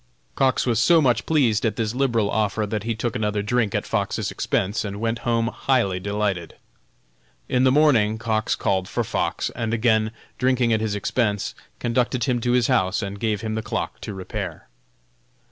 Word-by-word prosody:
Cox 130 -1 +2
was 115 -3 +1
so 165 +7 +5
much 125 -6 +2
pleased 125 -9 +2
at 110 -3 0
this 110 -1 -1
liberal 120 -6 +1
offer 105 0 0
that 105 0 -3
he 115 -1 -1
took 115 0 -3
another 105 -1 -1
drink 110 -1 0
at - - -1
Fox's - - -1
expense 100 +4 -1
and 100 -1 -5
went 115 +1 -1
home 115 -1 +1
highly 120 -9 0
delighted. 100 -3 -2 0.9
In 125 +1 +2
the 130 - +5
morning 125 -8 +4
Cox 110 -1 0
called 95 -2 0
for - - -1
Fox, - - -2
and 115 0 -2
again 110 -1 +2 0.3
drinking 125 -2 +2
at 110 - +1
his 110 -2 -1
expense, 105 0 -1 0.2
conducted 120 0 0
him 125 -3 0
to 120 +1 +1
his 125 -2 +3
house 95 +4 +1
and 100 0 -5
gave 110 -2 -1
him 110 -1 -3
the 110 - -2
clock - - -4
to 105 - -6
repair. 95 -1 -6
110 Hz, 180 wpm, -23 LUFS, 105-120 Hz, 0.9 s, so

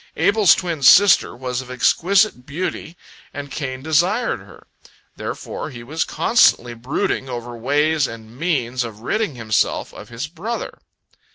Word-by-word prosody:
Abel's 205 -3 +5
twin 170 -5 -4
sister 185 +2 +6
was 125 0 -4
of 130 - -12
exquisite 180 - +2
beauty, 165 +3 -5 0.4
and 140 -1 -7
Cain 130 -3 -5
desired 175 +10 +1
her. - - -16 0.5
Therefore - - -6
he 120 -4 -10
was 155 +7 -2
constantly 155 - +3
brooding 130 +2 -2
over 120 -1 -6
ways 145 +5 +1
and 115 0 -11
means 130 -6 -1
of 110 -2 -8
ridding 210 - -1
himself 110 -3 -1
of - - -11
his 120 +4 -5
brother. 180 +9 -6
140 Hz, 140 wpm, -20 LUFS, 120-170 Hz, 0.5 s, sister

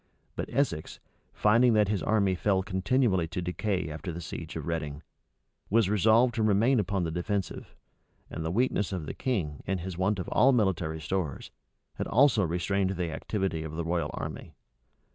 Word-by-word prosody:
But - - -4
Essex, 120 - -1 0.3
finding 115 +3 +4
that 105 -2 +4
his 100 -3 0
army 100 -3 +2
fell 95 +1 +1
continually 95 -1 +1
to 90 +3 -4
decay 90 +1 -2
after 85 +4 -5
the 85 - -6
siege 85 - -7
of - - -4
Reading, 75 -2 -3 0.7
was 110 -2 +3
resolved 110 +4 +4
to 115 - -1
remain 110 +4 +3
upon 100 -2 0
the 80 - -2
defensive; 95 +3 -3 0.5
and 80 - -6
the 80 - -2
weakness 105 0 +1
of 90 -5 -3
the - - -5
king, 85 - -2
and 95 -1 -1
his 90 0 -6
want 100 +2 +1
of 90 - -4
all 135 +2 +5
military 90 -8 0
stores, 80 -5 -3 0.5
had - - -2
also 125 -5 +4
restrained 95 +3 0
the 85 -3 -2
activity 95 -2 -2
of 80 0 -6
the 85 0 -3
royal 85 0 -1
army. - - -6
95 Hz, 175 wpm, -28 LUFS, 85-110 Hz, 0.7 s, all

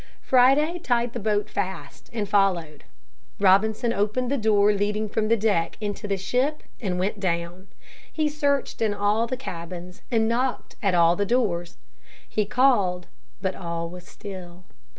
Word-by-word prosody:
Friday 275 +7 +4
tied 240 -5 0
the - - -3
boat 210 0 0
fast, 170 -10 -5
and 215 -3 -2
followed. 180 -7 +1 0.5
Robinson 215 +4 +3
opened 235 +5 0
the - - +2
door 210 -1 +4
leading 210 +1 -1
from 215 +1 -1
the 230 +1 +3
deck 200 -6 0
into 210 -1 -4
the 200 -1 0
ship 255 +10 -1 0.2
and 185 -5 -1
went 200 +3 -1
down. 175 0 -2 0.4
He 310 -1 0
searched 285 -4 0
in 215 -2 +1
all 210 +3 +1
the 255 +2 -3
cabins, 180 -5 -7
and 225 -2 +2
knocked 245 +2 -1
at 195 -4 +2
all 170 0 +5
the 205 - 0
doors. 180 -8 0 0.5
He 215 -2 -1
called, 200 -8 +2 0.4
but 190 -1 0
all 170 -2 -4
was 180 -1 -11
still. 185 -3 -9
205 Hz, 155 wpm, -25 LUFS, 180-235 Hz, 0.5 s, all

